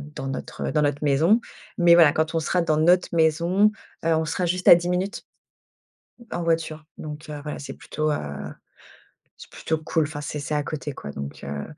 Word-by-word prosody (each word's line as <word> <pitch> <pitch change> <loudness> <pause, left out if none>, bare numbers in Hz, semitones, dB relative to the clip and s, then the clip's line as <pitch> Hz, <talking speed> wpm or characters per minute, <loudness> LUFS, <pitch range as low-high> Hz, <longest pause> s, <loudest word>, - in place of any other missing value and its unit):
dans 135 - -5
notre 135 - -4
dans 155 - +2
notre 145 0 0
maison. 160 - +3 0.4
Mais 170 -1 +6
voilà, 165 -4 +7
quand 155 +1 0
on - - +3
sera 175 +3 0
dans 155 -2 +1
notre 175 +3 +4
maison, 170 +6 +3 0.3
heu, 165 -1 +3
on 160 0 0
sera 170 +3 -1
juste 180 +1 -2
à - - +11
10 175 +1 -2
minutes 185 +3 -2 1.1
en 175 - -2
voiture. 165 -2 -1
Donc, 155 0 -8
heu, 150 -1 -5
voilà, 150 -1 -5
c'est 140 - -7
plutôt, 155 0 -2
heu - - 0 1.2
c'est - - -12
plutôt 160 - -2
cool 160 +1 0
enfin 145 0 -4
c'est 150 0 -5
c'est 150 +1 -2
à 145 - -1
côté 150 -1 -5
quoi, 70 - -8
donc, 70 0 -7
heu. 70 0 -4
155 Hz, 200 wpm, -24 LUFS, 150-170 Hz, 1.2 s, à